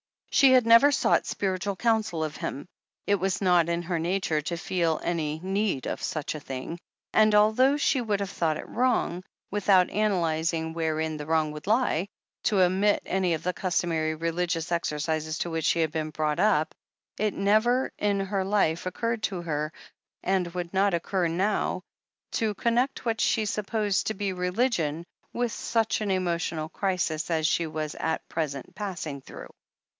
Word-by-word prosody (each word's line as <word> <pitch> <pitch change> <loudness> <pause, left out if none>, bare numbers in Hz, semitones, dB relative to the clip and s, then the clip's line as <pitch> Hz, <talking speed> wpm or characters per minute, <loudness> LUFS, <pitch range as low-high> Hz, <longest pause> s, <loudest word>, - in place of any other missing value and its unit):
She 270 -2 +6
had 250 -3 +5
never 230 +5 +7
sought - - +2
spiritual 195 0 -2
cotmsel 220 -7 +1
of 155 - -6
him. 140 - -4 0.4
It 205 - +3
was 190 0 -1
not 175 -3 +4
in 170 0 -1
her 170 -1 -2
nature 170 -2 0
to 170 +3 -3
feel 170 -3 0
any 155 -3 -1
need 195 -6 -1
of - - -3
such 155 -3 -3
a 155 - -6
thing, 135 +4 -6 0.3
and 215 -1 +5
although 220 +7 +4
she 280 -2 +2
would 210 -4 -1
have 200 - -2
thought 160 -4 0
it - - -8
wrong, 235 -7 0 0.3
with 205 0 -3
out 185 -2 +6
analyzing 165 -5 0
wherein 160 -1 -1
the 150 0 -7
wrong 160 -1 +1
would 150 +3 -9
lie, 210 -5 +2 0.4
to 200 -3 +3
omit 190 +3 +3
any 185 -3 +1
of 155 - -8
the 180 - 0
customary 165 -4 0
religious 165 +1 -2
exercises 155 -1 -1
to 170 - -2
which 160 -1 -2
she 170 - +3
had 160 -2 +1
been 155 0 -2
brought 155 -1 -1
up, 195 -7 +2 0.5
it 215 - +1
had 210 - 0
never 220 +6 +2
in 200 -1 +1
her 195 0 -1
life 190 -4 +1
occurred 230 +4 -2
to 180 -4 -2
her, 155 -2 -2 0.5
and 190 -2 +1
would 175 0 -4
not 195 -1 +3
occur 175 +1 0
now, 185 +1 0 0.5
to 215 -2 0
connect 240 +6 0
what 225 -1 0
she 220 - +2
supposed 210 -1 -1
to 220 - -1
be 195 -1 -2
"religion" 180 - 0 0.3
with 240 -1 -1
such 225 0 0
an 210 - -1
emotional 170 -4 -1
crisis 175 -5 -1
as 160 -2 +1
she 165 +1 +1
was 155 -1 -4
at 160 0 -2
present 150 0 -4
passing 175 -8 -5
through. - - -11
180 Hz, 175 wpm, -27 LUFS, 160-210 Hz, 0.5 s, never